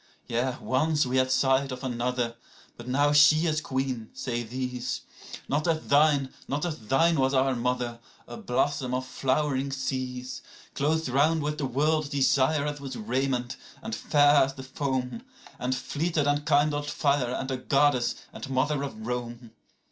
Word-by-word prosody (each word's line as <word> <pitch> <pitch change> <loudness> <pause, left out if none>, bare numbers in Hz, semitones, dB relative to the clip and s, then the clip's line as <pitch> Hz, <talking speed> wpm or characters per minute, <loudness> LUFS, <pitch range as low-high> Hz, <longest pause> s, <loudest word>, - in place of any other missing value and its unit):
77Yea, 125 +2 -1
once 150 +3 +1
we 130 +1 0
had 130 0 +2
sight 135 +1 +2
of 125 +1 -6
another: 125 -1 -1 0.4
but 120 - -11
now 145 +3 +2
she 150 +2 +6
is 155 -2 +1
queen, 130 -5 -3
say 120 -2 -3
these.78Not 125 +4 -4
as 160 -1 0
thine, 145 -2 +4
not 145 +4 -1
as 160 -4 -3
thine 165 +6 +3
was 135 +1 +2
our 130 0 +2
mother, 120 -1 -2 0.3
a 120 - -8
blossom 130 +1 -1
of 130 0 -2
flowering 135 +1 0
seas,79Clothed 130 +3 -3
round 155 +3 +3
with 150 +1 -2
the 140 - -1
world's 150 +3 +1
desire 140 +1 +2
as 145 -1 -4
with 135 -2 -6
raiment, 125 +2 -1 0.3
and 110 - -5
fair 145 +4 +4
as 135 0 -7
the 130 - -8
foam,80And 130 - -4
fleeter 155 +3 -1
than 145 +1 0
kindled 145 -1 +2
fire, 140 -5 +1
and 135 0 -3
a 130 - -1
goddess, 135 -1 +2 0.2
and - - -7
mother 135 +2 +1
of 110 -6 -6
Rome. 120 -1 -5
135 Hz, 155 wpm, -27 LUFS, 125-145 Hz, 0.4 s, she